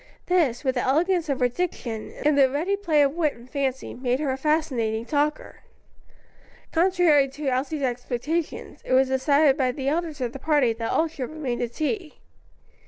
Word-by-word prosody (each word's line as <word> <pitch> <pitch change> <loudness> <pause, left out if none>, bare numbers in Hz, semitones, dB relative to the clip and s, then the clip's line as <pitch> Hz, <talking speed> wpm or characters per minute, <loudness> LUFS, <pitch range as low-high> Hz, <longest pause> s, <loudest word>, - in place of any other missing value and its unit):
These, 320 -10 +1
with 260 -2 +1
the 250 - -1
elegance 335 +4 +1
of 270 -2 -1
her 250 - +5
diction, 245 -6 -4
and 300 -1 +4
the 275 -2 +5
ready 325 +9 0
play 330 -7 +2
of 275 0 +1
wit 315 -3 0
and 235 +1 -15
fancy, 265 -1 -3
made 250 +1 -1
her 290 -3 -1
a - - -1
fascinating 265 -7 0
talker. 295 +2 -1 1.1
Contrary 335 -5 +4
to 280 +1 -3
Elsie's 275 +3 -2
expectations, 250 +6 -3
it - - -2
was 260 0 +4
decided 280 +2 +3
by 260 -3 +1
the 270 +1 -2
elders 320 -1 -2
of 245 -2 -3
the 275 - -7
party 285 -5 +2
that 225 0 -4
all 325 - +2
should 285 -6 -6
remain 285 -6 -4
to 240 - -1
tea. 310 - -3
280 Hz, 180 wpm, -25 LUFS, 255-315 Hz, 1.1 s, her